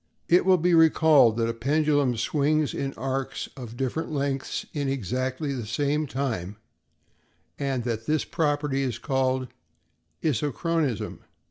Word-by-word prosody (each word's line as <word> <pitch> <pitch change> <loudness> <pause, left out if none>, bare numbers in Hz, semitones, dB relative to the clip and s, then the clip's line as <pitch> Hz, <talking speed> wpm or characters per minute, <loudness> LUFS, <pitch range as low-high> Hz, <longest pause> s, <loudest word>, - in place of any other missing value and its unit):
It 175 +1 +4
will 185 -1 +6
be 175 +1 +2
recalled 155 -7 +5
that 115 -1 +1
a 115 - -1
pendulum 145 +1 +1
swings 150 +5 +1
in 135 -1 -3
arcs 135 0 -3
of 120 -3 -9
different 135 +5 -2
lengths 140 -2 -2
in 145 -3 -1
exactly 130 - -2
the 120 -5 -5
same 145 +6 0
time 115 -9 -3 1.0
and 135 -3 -1
that 115 -2 -3
this 155 0 +1
property 145 -4 0
is 125 -4 -2
called 130 -1 0 0.7
isochronism. 150 - -1
135 Hz, 130 wpm, -26 LUFS, 125-150 Hz, 1.0 s, will